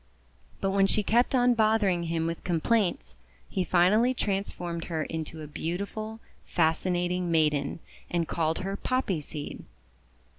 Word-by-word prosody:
But 195 - +1
when 195 0 +4
she 210 - +1
kept 240 +6 +3
on 245 -1 +5
bothering 215 -6 +2
him 165 0 -1
with 165 0 -3
complaints, 185 - 0 0.3
he 190 - -1
finally 210 +9 +4
trans 200 -3 -1
formed 170 -1 -5
her 160 -2 -2
into 160 0 -5
a - - -7
beautiful, 200 +8 -4 0.3
fascinating 175 +2 +1
maiden, 150 -4 +2 0.3
and 170 -2 0
called 160 0 0
her 195 0 -2
Poppy 205 -8 -1
Seed. 145 0 -7
180 Hz, 140 wpm, -28 LUFS, 165-210 Hz, 0.3 s, on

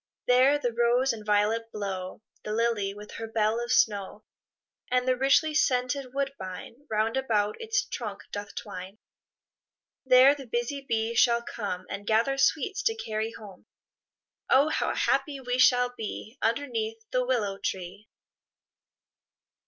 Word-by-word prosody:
There 255 +3 +5
the 245 -5 -2
rose 240 +3 +2
and 220 -2 -8
violet 210 +2 +1
blow, 195 -1 -5 0.2
The 210 - -4
lily 225 -3 0
with 210 +1 -11
her 225 - -5
bell 220 +1 0
of 240 - -4
snow, 210 -3 +1 0.7
And 250 0 +1
the 255 - +3
richly 275 +4 +3
scented 255 -1 +1
woodbine, 270 -1 -5
Round 220 +3 0
about 215 - 0
its 455 +2 0
trunk 210 -5 -6
doth 205 0 -6
twine; 185 +3 -7 1.1
There 260 +1 +7
the 275 -3 -9
busy 240 +4 -2
bee 225 -3 -1
shall 235 0 +3
come, 200 -6 -5
And 200 0 -7
gather 235 +5 +2
sweets 320 - +1
to 455 -3 +1
carry 220 - -3
home. 200 -4 -13 0.8
Oh, 280 +4 +5
how - - -1
happy 275 +1 0
we 250 -1 -2
shall 245 -1 +4
be, 220 +1 -6
Underneath 225 -2 -1
the 255 0 +1
willow 215 -6 -1
tree! 185 +3 -5
235 Hz, 140 wpm, -27 LUFS, 210-260 Hz, 1.1 s, There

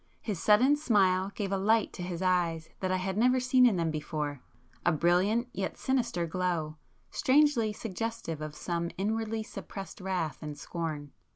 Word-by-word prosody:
His 200 -7 -4
sudden 245 +7 +5
smile 195 -9 +3
gave 200 -2 -3
a 195 - +1
light 220 +2 +2
to - - -7
his 175 0 -4
eyes 170 -3 +1
that 185 -1 -1
I 185 - +2
had 190 +2 -2
never 250 +2 +4
seen 250 0 +5
in 225 - +2
them 165 -2 0
before,—a 150 +1 -4
brilliant 180 - +2
yet 190 0 -3
sinister 235 -10 0
glow, 165 -3 -2 0.3
strangely 275 -5 +3
suggestive 210 -6 -4
of 155 -1 -5
some 170 0 -2
inwardly 220 +2 -1
suppressed 195 -2 -8
wrath 185 -5 -2
and 150 -2 -6
scorn. 155 -4 -5
185 Hz, 160 wpm, -30 LUFS, 170-225 Hz, 0.3 s, sudden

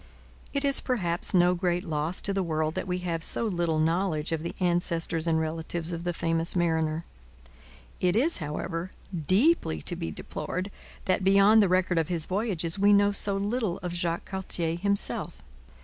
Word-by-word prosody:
It 280 0 -1
is 275 -1 +4
perhaps 180 -10 -1
no 180 -1 +4
great 175 0 -1
loss 160 0 -2
to 200 - 0
the 195 - 0
world 155 -3 -1
that - - -4
we 180 0 -1
have 165 -2 -2
so 230 - +1
little 170 -6 0
knowledge 160 0 0
of 165 -1 -1
the 170 - -5
ancestors 170 -2 0
and 160 -1 +2
relatives 160 +1 -3
of 170 +1 -5
the 175 - 0
famous 165 0 0
mariner. 160 -2 0 0.9
It 180 +1 +1
is, 285 +9 +3
however, 165 +3 -4 0.3
deeply 185 - +2
to - - -4
be 80 - -4
deplored 185 - -5 0.3
that, 185 0 +1
beyond 200 +3 +6
the 200 - +3
record 185 -1 +2
of 160 - 0
his 170 -3 0
voyages, 185 -3 -1
we 205 +1 +5
know 205 0 +4
so 200 0 +3
little 205 -2 -1
of 175 -1 -3
Jacques 170 -1 -2
Cartier 175 -4 -2
himself. 200 +3 -1
175 Hz, 175 wpm, -27 LUFS, 165-195 Hz, 0.9 s, beyond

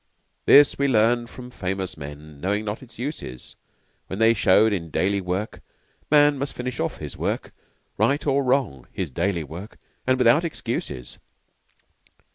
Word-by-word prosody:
This 145 0 +7
we 140 - +3
learned 120 0 +2
from 125 -1 -10
famous 95 -3 -3
men 75 0 -10
Knowing 105 +3 -1
not 105 +1 -4
its 130 - -15
uses 120 - -6 0.5
When 95 - -5
they 115 +1 +5
showed 105 +1 +4
in 85 -4 -3
daily 100 +5 0
work 95 +4 -3 0.5
Man 145 -1 +5
must 140 +1 -3
finish 125 0 -4
off - - -2
his - - -8
work - - -3 0.5
Right 140 +2 +2
or 140 -1 +2
wrong, 125 - 0
his 90 -6 -4
daily 85 +3 -1
work 85 - -9 0.3
And 130 0 +3
without 125 +6 +4
excuses. 65 - -4
110 Hz, 150 wpm, -24 LUFS, 90-130 Hz, 0.5 s, This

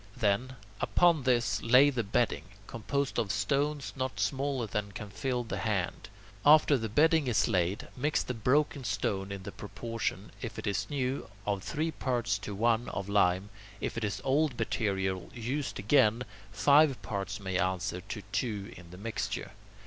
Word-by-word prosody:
Then, 115 +5 +1 0.2
upon 170 -4 +3
this 120 -2 +2
lay 130 +5 +6
the 125 -3 0
bedding, 105 -6 0 0.2
composed 140 +6 -2
of 100 -4 0
stones 140 +9 0
not 130 -6 -3
smaller 135 +4 0
than 100 -1 -3
can 105 0 -7
fill 125 +4 -1
the 105 -4 -4
hand. 95 -3 -2 0.3
After 150 0 +7
the 115 -4 -2
bedding 160 - +4
is 120 - +3
laid, 95 -1 0
mix 145 +4 0
the 125 - -3
broken 135 +5 +1
stone 100 -2 -1
in 100 -1 -6
the - - -6
proportions, 115 +1 -4
if - - -5
it - - -5
is 100 - -1
new, 135 -5 -2 0.2
of 100 -2 -1
three 160 +9 -2
parts 125 -6 -1
to 100 - -6
one 115 +2 +2
of 100 0 -4
lime; 100 0 +2 0.3
if - - -3
it 115 - -3
is 105 -1 -2
old 135 -1 +2
material 95 -5 -1
used 130 +5 -3
again, 120 0 +3 0.3
five 145 +3 +5
parts 100 0 -3
may 95 -2 -2
answer 95 0 -1
to 105 +2 -7
two 105 -4 -2
in 85 -2 -13
the 90 - -11
mixture. 110 +3 -4
115 Hz, 165 wpm, -30 LUFS, 100-135 Hz, 0.3 s, After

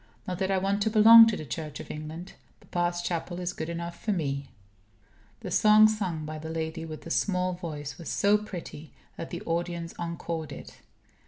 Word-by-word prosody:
Not 180 -1 -3
that 190 -1 0
I 195 - +2
want 195 +2 0
to 220 - +2
belong 225 +1 +9
to 220 - 0
the 155 - -7
Church 150 +3 -6
of - - -8
England. 155 +4 -7 0.4
Papa's 175 0 0
chapel 175 +1 -3
is 180 0 -3
good 160 - -5
enough 170 0 -5
for 215 - 0
me. 140 -7 -2 0.9
The - - -6
song 215 0 +6
sung 185 -8 -2
by 155 0 -6
the 160 +1 -7
lady 160 0 -4
with 155 -1 -8
the 165 - -7
small 185 -1 +1
voice 150 -6 -6
was 170 - -7
so 205 +1 +3
pretty 175 -7 -9 0.2
that 165 - -7
the 175 +4 -6
audience 170 -1 -3
encored 165 -2 -4
it. - - -10
170 Hz, 190 wpm, -28 LUFS, 160-190 Hz, 0.9 s, belong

